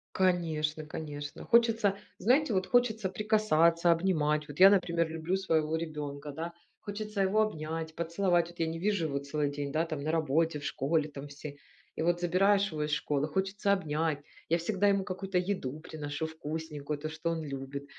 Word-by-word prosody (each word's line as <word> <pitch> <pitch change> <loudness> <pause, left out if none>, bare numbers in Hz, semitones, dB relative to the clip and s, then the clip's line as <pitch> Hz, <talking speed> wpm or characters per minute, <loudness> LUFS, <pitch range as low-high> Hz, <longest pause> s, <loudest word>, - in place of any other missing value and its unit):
Конечно, 160 -4 +1
конечно. 145 -2 -6
Хочется, 230 -4 +3 0.2
знаете, 255 +1 +3
вот 185 0 +1
хочется 220 -5 +2
прикасаться, 175 -6 +3
обнимать. 155 -4 +1
Вот 145 +2 -9
я, 195 - +10
например, 170 -4 +2
люблю 165 +3 -2
своего 160 -5 +1
ребёнка, 150 -3 -5
да, 165 +4 -5 0.3
хочется 210 0 -4
его 205 +3 +3
обнять, 160 -5 -3
поцеловать, 170 0 +1
вот 175 - -16
я 165 - +1
не 165 +1 -3
вижу 195 -2 +1
его 140 -2 -1
целый 140 +1 -1
день, 145 -1 -4
да, 160 +2 +1
там 155 -4 -4
на 155 - 0
работе, 160 0 +1
в - - -11
школе 145 +3 0
там 145 0 -8
все. 145 0 -8 0.4
И - - -3
вот 175 +1 +2
забираешь 195 +3 +3
его 150 -1 -2
из 150 - -2
школы, 150 0 0
хочется 195 +5 0
обнять, 155 -4 0 0.3
я 170 - +4
всегда 195 +4 +1
ему 195 -1 +3
какую-то 190 -1 -3
еду 175 -7 -3
приношу 150 -1 -5
вкусненькую, 155 -2 -5
то, 155 +1 -4
что 160 +1 -3
он 160 -1 -3
любит. 140 0 -6
165 Hz, 175 wpm, -30 LUFS, 150-190 Hz, 0.4 s, я